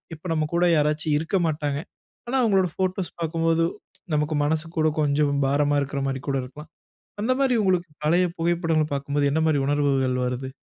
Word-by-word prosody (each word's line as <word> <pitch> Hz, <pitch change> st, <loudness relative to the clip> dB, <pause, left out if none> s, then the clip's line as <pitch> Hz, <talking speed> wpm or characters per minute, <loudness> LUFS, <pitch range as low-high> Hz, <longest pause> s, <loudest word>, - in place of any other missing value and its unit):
இப்ப 160 Hz, -, -22 dB
நம்ம 155 Hz, -1 st, 0 dB
கூட 170 Hz, +1 st, +3 dB
யாராச்சும் 150 Hz, 0 st, +1 dB
இருக்க 165 Hz, +5 st, -1 dB
மாட்டாங்க. 145 Hz, -2 st, -2 dB, 0.5 s
ஆனா, 260 Hz, +3 st, 0 dB
அவுங்களோட 195 Hz, -6 st, +3 dB
போட்டோஸ் 185 Hz, -1 st, -1 dB
பார்க்கும்போது, 165 Hz, 0 st, +1 dB, 0.5 s
நமக்கு 150 Hz, +1 st, 0 dB
மனசு 155 Hz, +2 st, 0 dB
கூட 155 Hz, 0 st, +3 dB
கொஞ்சம் 145 Hz, 0 st, +2 dB
பாரமா 145 Hz, +1 st, +2 dB
இருக்குறமாரி 135 Hz, -1 st, -2 dB
கூட 135 Hz, -, +1 dB
இருக்கலாம். 150 Hz, +5 st, -11 dB, 0.5 s
அந்தமாரி 255 Hz, +2 st, +2 dB
உங்களுக்கு 180 Hz, -3 st, +1 dB, 0.2 s
பழைய 175 Hz, +4 st, +3 dB
புகைப்படங்கள் 165 Hz, -2 st, +1 dB
பார்க்கும்போது 140 Hz, +1 st, 0 dB
என்னமாரி 160 Hz, -1 st, +2 dB
உணர்வுகள் 140 Hz, -3 st, +1 dB
வருது? 125 Hz, +1 st, -3 dB
155 Hz, 145 wpm, -24 LUFS, 145-170 Hz, 0.5 s, கூட